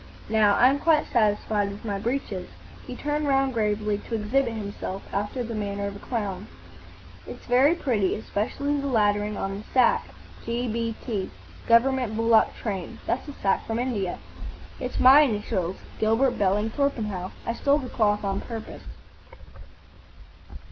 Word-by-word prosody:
Now, 215 -2 +4
I'm 265 +3 +4
quite 320 0 +3
satisfied 210 -2 +2
with 200 +3 -9
my 200 -2 -2
breeches." 215 -5 -3 0.4
He 250 - -6
turned 295 +2 -2
round 270 -1 +2
gravely 210 -2 0
to 230 - -5
exhibit 235 +4 +1
himself, 200 -3 -5
after 205 +5 -2
the 235 0 -5
manner 200 -1 -3
of 200 0 -4
a - - -9
clown. 205 -5 -4 0.8
"It's - - -9
very 265 +7 +4
pretty. 215 - 0
Specially 280 +8 -1
the 280 - -3
lettering 210 -4 +1
on 195 +1 -3
the - - -9
sack. 250 -2 +4 0.4
G.B.T. 230 -3 -3 0.4
Government 240 -1 +3
Bullock 225 0 +3
Train. 195 -6 -5
That's 250 - -2
a 290 - -7
sack 195 -1 +1
from 225 - -1
India." 230 -7 -2 0.6
"It's 250 - -4
my 265 +3 +8
initials,—Gilbert 215 - 0
Belling 205 +1 +1
Torpenhow. 215 -10 -1 0.2
I 230 - -1
stole 280 +4 +2
the 270 -4 -5
cloth 210 -3 +1
on 195 0 -1
purpose. 225 -2 -7
220 Hz, 140 wpm, -25 LUFS, 205-255 Hz, 0.8 s, my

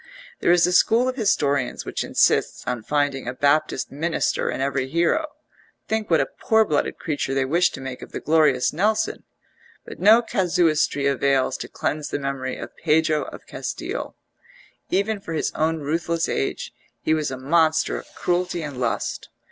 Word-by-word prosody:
There - - +1
is 175 0 +5
a 180 - 0
school 230 +7 +4
of 255 - -1
historians 145 - 0
which - - -3
insists - - +1
on 125 -2 -2
finding 145 +1 -1
a 125 - -3
Baptist 145 0 +1
Minister 160 +4 -1
in - - -3
every 135 -1 -1
hero 170 - +1 0.6
think 220 -1 -1
what 165 -2 +4
a 135 - +2
poor 220 +9 +1
blooded 150 -6 -1
creature 145 -3 -2
they 135 -1 +1
wish 170 +6 +3
to - - -9
make 130 -1 -6
of - - -10
the - - -4
glorious 150 -5 +3
Nelson 215 +6 0 0.6
but - - -10
no 220 +5 +6
casuistry 165 -8 +1
avails 135 -1 +2
to - - -6
cleanse 150 0 -3
the - - -2
memory 135 -2 -3
of - - -8
Pedro 155 -1 +2
of - - -10
Castille: - - -5 0.7
even 200 +2 0
for 165 -5 -6
his 155 - -1
own 160 0 0
ruthless 165 +3 -1
age 70 - -2 0.3
he 155 - +2
was 155 -2 0
a 130 - -5
monster 160 +3 +2
of - - -8
cruelty 175 -1 -1
and 145 -4 -6
lust. 115 -4 -2
155 Hz, 170 wpm, -23 LUFS, 135-175 Hz, 0.7 s, no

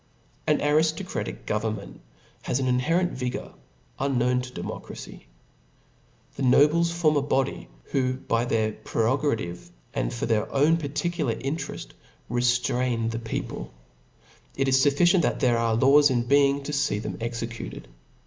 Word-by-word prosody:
An 150 - +4
ariftocraticaf 160 +5 0
government 105 -1 -3 0.4
h^ 125 - 0
an 135 - -1
inherent 165 +9 +1
vigour, 125 -1 -4 0.5
unknown 125 -2 +1
to 125 0 -8
democracy. - - -8 1.1
The - - -7
nobles 150 +6 +4
form 160 -3 +2
a - - +3
body, 135 -1 -1 0.2
who 130 -2 +1
by 120 -2 -1
their 110 -2 +1
prerogative, 115 - -1 0.2
and - - -1
Tor - - -3
their 110 -2 0
own 150 +4 +4
particular 150 -3 -2
intereft, 140 +7 -5 0.4
reftraifi 120 -1 +1
the 115 - -3
people; 110 - -5 0.8
It 135 0 0
is 130 0 +4
fufiicient, 175 +6 +4
that - - 0
there 120 -2 +3
are 115 -1 +1
laws 140 +4 +6
in 120 -2 +1
being 140 +2 +3
to 150 - -4
feef 140 -7 0
them - - -5
C3^ecuted. 115 - -5
130 Hz, 135 wpm, -26 LUFS, 115-145 Hz, 1.1 s, laws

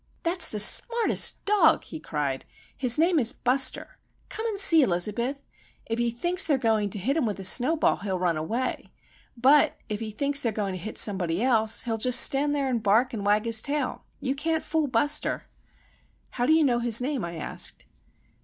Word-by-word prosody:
"That's 335 -1 +2
the 215 - -6
smartest 465 - +3
dog!" 395 -6 +2
he - - -10
cried. 145 -4 -4 0.3
"His 250 -3 +2
name 335 +1 +2
is 230 -3 +1
Buster. 260 +1 0 0.3
Come 445 +1 -5
and 430 -3 -4
see, 330 -5 +6
Elizabeth. 235 +7 -2 0.4
If 225 +1 -4
he 240 0 0
thinks 345 +11 0
they're 290 -4 0
going 220 -4 -1
to 205 - -2
hit 250 +9 -2
him 315 -8 -1
with 205 -2 -5
a - - -7
snowball, 265 - +3
he'll 195 -2 -4
run 175 -2 -1
away,—but, 255 - -2
if 210 -1 -4
he 225 -1 -6
thinks 280 +6 -1
they're 230 - -2
going 205 -2 -4
to 185 - -7
hit 215 - -8
somebody 185 -2 0
else, 225 -3 +1
he'll 225 -2 -4
just 250 +2 +2
stand 290 +1 +3
and 260 -4 -2
bark 225 +5 +1
and 210 -3 -5
wag 210 +2 +1
his 225 -1 +1
tail. 290 +3 -4 0.2
You 265 -1 -3
can't 320 +3 -3
fool 315 -2 -2
Buster!" 290 +5 0 0.9
"How 245 0 -3
do 315 - +4
you 320 0 +3
know 245 -4 +1
his 235 -2 +3
name?" 260 -1 -4
I 170 0 -6
asked. 160 - -1
245 Hz, 190 wpm, -25 LUFS, 210-290 Hz, 0.9 s, see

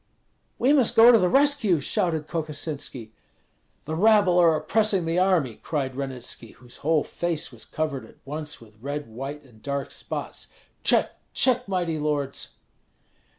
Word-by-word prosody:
"We 265 +4 +3
must 255 -5 +4
go 230 +2 +9
to 230 - +6
the 180 - +2
rescue!" 275 - +3
shouted 160 +2 -1
Kokosinski. 150 -7 -4 0.7
"The 155 - -4
rabble 200 -1 +4
are 165 -2 +5
oppressing 195 +3 +1
the 165 +2 +1
army!" 175 - +2
cried 135 -4 -2
Ranitski, 130 -4 -6
whose 125 -1 -14
whole 155 0 +1
face 170 -4 -3
was 120 -3 -10
covered 155 -4 -3
at - - -19
once 150 +1 -5
with 110 -2 -18
red, 145 +2 -4
white, 135 +6 -7
and 115 -5 -20
dark 140 +2 -3
spots. - - -6 0.4
"Check, - - +2
check! 250 -1 +2
mighty 175 -5 -1
lords!" 145 -2 -2
155 Hz, 150 wpm, -25 LUFS, 140-185 Hz, 0.7 s, go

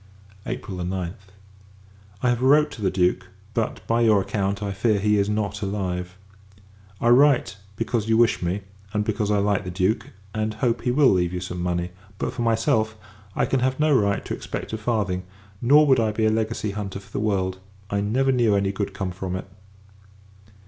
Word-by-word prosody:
April 95 - -5
9th. 90 +1 -4 0.9
I 125 - +4
have 120 0 +1
wrote 150 +3 +5
to 110 - -9
the 95 - +2
Duke; 90 0 +1 0.3
but, 115 -1 -2
by 115 +1 +1
your 110 -3 +5
account, 100 +1 -1
I 100 - -2
fear 105 +2 +1
he 105 +1 +2
is 100 +1 +1
not 105 -1 -2
alive. 90 -2 -3 0.8
I 120 - +2
write, 125 -7 +4 0.2
because 115 0 -1
you 110 - +4
wish 120 -1 +3
me; 90 +3 -1 0.3
and, 105 -1 0
because 105 -1 -1
I 105 - +3
like 100 0 +1
the 90 - -5
Duke, 95 +5 0 0.2
and 110 0 -2
hope 115 +1 0
he 125 - -1
will 135 +1 +5
leave 90 -2 +1
you 90 - -2
some 90 -1 -5
money. 90 0 -1 0.3
But, - - -2
for 125 - -4
myself, 110 -1 +1 0.4
I - - +2
can 135 - +1
have 130 +2 0
no 150 -1 +4
right 100 -4 +1
to - - -3
expect - - -5
a - - -1
farthing: 105 -5 0 0.4
nor 145 +5 +6
would 130 -3 +4
I 110 -1 +2
be 110 +1 0
a 110 - +4
legacy 110 -1 -1
hunter 100 -1 -5
for 100 - -18
the - - -3
world; 95 -3 0 0.3
I 100 0 +1
never 130 +6 +2
knew 120 -5 +3
any 100 -1 +1
good 100 0 -4
come 95 -3 -3
from 90 0 -4
it. 95 - -5
105 Hz, 195 wpm, -24 LUFS, 95-115 Hz, 0.9 s, nor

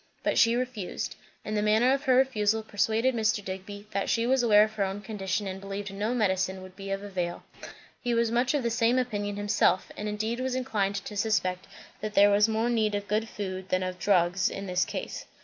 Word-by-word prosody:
But - - +2
she 230 +1 +5
refused; 245 -6 -3 0.3
and 215 - -3
the 210 - +1
manner 220 +5 +4
of 275 +2 -2
her 260 -2 +4
refusal 220 -4 +2
persuaded 220 +4 +1
Mr. 220 -3 0
Digby 195 +2 -7
that 200 0 -1
she 230 0 +2
was 260 +1 +3
aware 210 -3 +6
of 215 0 -2
her 210 -2 0
own 195 +1 -3
condition 205 -1 -3
and 190 0 -5
believed 195 0 -5
no 210 +5 -1
medicine 190 -4 0
would 185 0 -12
be 195 0 -8
of 195 +1 -2
avail. 180 -4 -4 0.6
He 240 -1 0
was 230 -1 +2
much 245 +4 +2
of 280 - 0
the 235 - 0
same 235 +2 +2
opinion 205 -5 -1
himself; 205 -3 +1
and 210 0 -4
indeed 220 +3 -2
was 260 0 -1
inclined 210 -6 -1
to 200 +1 -5
suspect 190 -4 0 0.3
that 215 0 -5
there 205 +1 +7
was 205 +2 +4
more 220 +1 +1
need 215 -3 +1
of 205 0 -3
good 220 +2 0
food 190 -2 -5
than 185 0 +1
of 185 0 -4
drugs 180 -1 +2
in 195 - -6
this 180 -1 +1
case. - - -6
210 Hz, 220 wpm, -28 LUFS, 195-230 Hz, 0.6 s, there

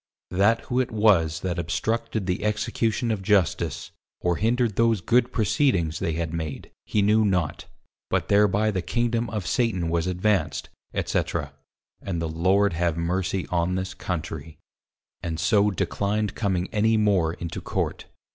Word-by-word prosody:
_That 100 +5 +3
who 125 0 -1
it 130 - +1
was 95 -7 +3
that 90 -2 -2
obstructed 110 +5 -1
the 90 +1 -1
Execution 110 +2 0
of 105 -3 -2
Justice, 95 -4 +1 0.3
or 90 -1 0
hindred 115 -1 +1
those 115 -1 +3
good 120 +6 +2
proceedings 105 - +1
they 80 - -1
had 80 0 -3
made, 80 -4 -5 0.2
he 105 - +1
knew 110 +2 +4
not, 90 -7 0 0.4
but - - 0
thereby 105 +1 +3
the 95 -3 -1
Kingdom 120 +5 0
of 105 -4 -4
Satan 100 -9 0
was 85 +1 0
advanc'd_, 90 -3 0 0.4
&c. - - 0 0.6
and 90 -4 -3
the 80 - -1
Lord 95 +5 +2
have 85 -1 0
mercy 90 +2 -1
on 90 +1 +1
this 95 0 -3
Country: 80 -3 -5 0.6
and 80 -1 -3
so 105 +1 +3
declined 105 +2 -1
coming 95 -4 -1
any 110 +1 +2
more 95 -6 +2
into 85 -2 -6
Court. - - -3
95 Hz, 150 wpm, -25 LUFS, 85-110 Hz, 0.6 s, knew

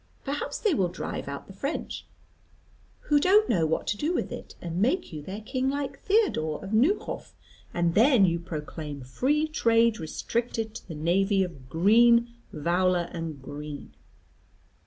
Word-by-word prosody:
Perhaps 280 +1 -3
they 425 -5 +1
will 190 -10 +2
drive 175 - -5
out 140 0 -6
the 195 - -12
French, 275 +10 -4 0.9
who 295 -1 +3
don't 410 +7 +5
know 165 -6 +2
what 160 - -1
to 205 - -1
do 315 +10 0
with - - -2
it, - - -8
and 170 +1 -3
make 305 - +1
you 150 - -5
their 190 +8 -7
king 260 +4 -1
like 280 0 -3
Theodore 390 - +1
of 195 +2 -6
Neuhoff; 275 - +1 0.4
and 170 -1 +1
then 230 - +6
you 170 -1 +1
proclaim 155 -3 -6
free 270 - 0
trade 230 -6 +3
restricted 225 +7 -3
to 230 - -10
the 165 - -7
navy 190 +5 +2
of 140 -8 -8
Green, 235 - +5 0.2
Vowler, 175 +2 +1
and 165 -4 -5
Green. 145 +1 -8
195 Hz, 155 wpm, -27 LUFS, 165-255 Hz, 0.9 s, then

